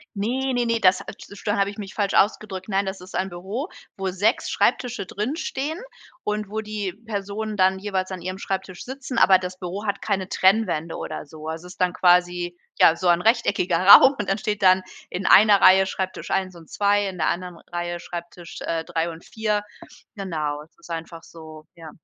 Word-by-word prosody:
Ne, 255 +6 -1
ne, 245 -1 +1
ne, 230 -1 +1
das, 185 -1 +4
ah, - - -8
tsch 205 0 -13
dann 205 - +1
habe 200 0 +1
ich 205 - -12
mich 195 -2 -8
falsch 200 -2 0
ausgedrückt. 195 -1 +1
Nein, 195 0 +1
das 190 0 -5
ist 185 0 -11
ein 190 +1 -1
Büro, 195 - -5 0.3
wo 195 -1 -2
6 205 +7 +1
Schreibtische 240 -6 0
drin 215 +9 -3
stehen 310 0 -3 0.4
und 210 -1 -2
wo 220 +1 -2
die 210 -3 -4
Personen 210 0 -5
dann 190 0 +3
jeweils 190 -2 -2
an 185 -2 -6
ihrem 185 +2 -5
Schreibtisch 190 -2 -5
sitzen, 265 0 -6
aber 190 -1 +6
das 185 0 -6
Büro 190 +3 -6
hat 200 0 -2
keine 195 -3 -1
Trennwände 185 -5 +1
oder 155 - -6
so. 155 +1 -11
Also, 160 +2 -5
ist 180 +1 -11
dann 180 0 +2
quasi 175 -1 +2 0.2
ja, 165 - +7
so 180 +2 -2
ein 175 0 +4
rechteckiger 205 -6 +2
Raum 265 +6 +10
und 210 - -2
dann 195 - +1
steht 210 0 -3
dann 185 0 +5 0.3
in 180 +1 -5
einer 205 -1 +7
Reihe 190 +1 +7
Schreibtisch 190 -1 -4
1 185 -2 -1
und 165 -2 -15
2, 205 0 +1
in 185 -2 -6
der 160 - +1
anderen 180 -1 -4
Reihe 175 0 -3
Schreibtisch, 170 0 -9
äh, 165 -1 -2
3 165 +1 -2
und 165 0 -12
4, 215 -2 -1 0.6
genau, 155 -6 -3
es 155 - -21
ist 170 - -16
einfach 165 0 -6
so, 155 -2 -13
ja. 165 -2 -11
190 Hz, 205 wpm, -23 LUFS, 175-210 Hz, 0.6 s, Raum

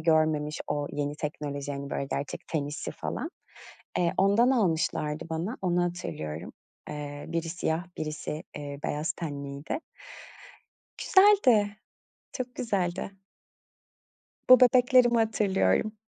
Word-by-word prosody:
görmemiş 155 -2 +2
o 145 0 -1
yeni 145 0 -2
teknoloji 145 -2 -4
hani, 140 0 -6
böyle 140 - -2
gerçek 140 - -3
ten 155 -4 -1
hissi 145 +1 -5
falan. - - -4 0.7
Eee, 170 -1 +2
ondan 205 +6 +5
almışlardı 165 -8 0
bana, 170 +9 -2
onu 180 -1 +2
hatırlıyorum. 85 - -5 0.4
Eee, 145 -1 -6
biri 165 0 -2
siyah 165 -1 -1
birisi, 155 0 -4 0.2
eee, 145 -1 -6
beyaz 150 +2 -1
tenliydi. 140 - -5 1.2
Güzeldi, 255 - +5 0.6
çok 255 -1 -5
güzeldi. 190 -5 -1 1.4
Bu 255 - +10
bebeklerimi 250 -1 +5
hatırlıyorum. 215 - +2
160 Hz, 110 wpm, -28 LUFS, 145-210 Hz, 1.4 s, Bu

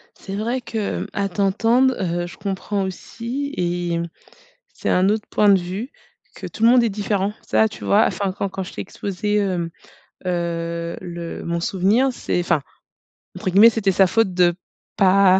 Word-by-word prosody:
C'est 195 0 -7
vrai 235 +5 -1
qu'à 205 -3 -3
t'entendre, 225 +7 +2
heu, 175 -1 -1
je 190 - -12
comprends 200 0 -2
aussi 235 +9 -5
et, 175 -1 -1 0.7
c'est - - -3
un 185 +2 +3
autre 215 0 -1
point 210 - +3
de 195 -2 +6
vue, 190 +9 -5 0.4
que - - -7
tout 220 - -5
le 230 - +7
monde 245 0 +6
est 230 - +2
différent. 205 0 -1
Ça, 220 - +3
tu 210 - -10
vois, 210 +3 +5
enfin, 195 -2 -1
quand 200 +1 -3
quand 190 +1 -4
je 185 - -10
t'ai - - -4
exposé, 200 +2 -3
hem, 180 -4 0 0.6
heu, 170 -1 -2
le 170 -2 -6
mon 170 0 -1
souvenir. 205 +10 +2
C'est 235 - -2
enfin, 170 -3 +1 0.8
entre - - -2
guillemets, 205 +5 +8
c'était 215 -4 +1
sa 190 +1 +4
faute 195 0 +2
de 175 -1 +3 0.4
pas 190 -1 +5
195 Hz, 170 wpm, -21 LUFS, 175-215 Hz, 0.8 s, guillemets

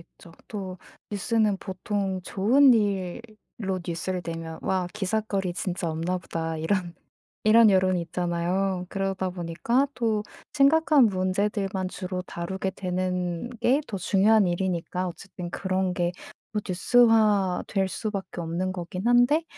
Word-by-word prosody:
있죠. 165 0 -17 0.2
또 190 -4 -6 0.3
뉴스는 210 0 +1
보통 190 0 -3
좋은 250 +10 +5
일로 200 -1 -3
뉴스를 175 +2 -3
내면 165 -1 -6
'와 185 -1 0
기삿거리 200 -2 -1
진짜 175 -3 -2
없나 170 +3 -1
보다.' 165 -2 -4
이런 175 +2 -1 0.5
이런 220 0 +7
여론이 185 -2 +3
있잖아요. 180 +2 -1
그러다 195 -1 -2
보니까 180 +10 0
또 220 -3 0 0.3
심각한 295 -1 +5
문제들만 190 0 0
주로 185 -1 -4
다루게 190 +2 -4
되는 180 +2 -2
게 270 +5 +3
더 200 - -4
중요한 200 +3 +4
일이니까 180 0 -1
어쨌든 175 0 -8
그런 190 -1 -1
게 175 -1 0 0.4
뭐 210 - -1
뉴스화 210 -1 +4
될 195 -1 0
수 215 +3 -3
밖에 190 -4 -5
없는 175 +3 -2
거긴 180 +3 -5
한데 245 +7 +4
190 Hz, 275 characters per minute, -26 LUFS, 180-210 Hz, 0.5 s, 이런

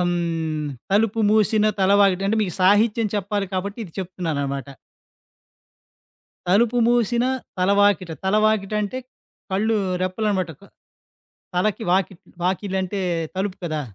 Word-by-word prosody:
హ్మ్, 165 -3 -1 0.2
తలుపు 220 +2 +2
మూశిన 215 0 +3
తల 190 0 +3
వాకిట 195 -1 +3
అంటే 220 - +1
మీకు 185 -5 -3
సాహిత్యం 210 +3 +4
చెప్పాలి 200 0 -2
కాబట్టి, 200 +4 -3
ఇది 170 - -13
చెప్తున్నాననమాట. 150 -7 -3 1.8
తలుపు 230 +5 +3
మూసిన 240 0 +2 0.3
తలవాకిట. 200 -1 +3
తలవాకిట 215 0 +2
అంటే, 230 +6 -3 0.5
కళ్ళు 215 +4 +1 0.3
రెప్పలనమాట 185 -1 -1 1.0
తలకి 210 +5 0
వాక్ 190 +1 +2 0.3
వాకిళ్లు 190 +1 -1
అంటే 195 +2 -3 0.3
తలుపు 190 0 -2
కదా! 155 -3 -2
195 Hz, 110 wpm, -22 LUFS, 180-215 Hz, 1.8 s, సాహిత్యం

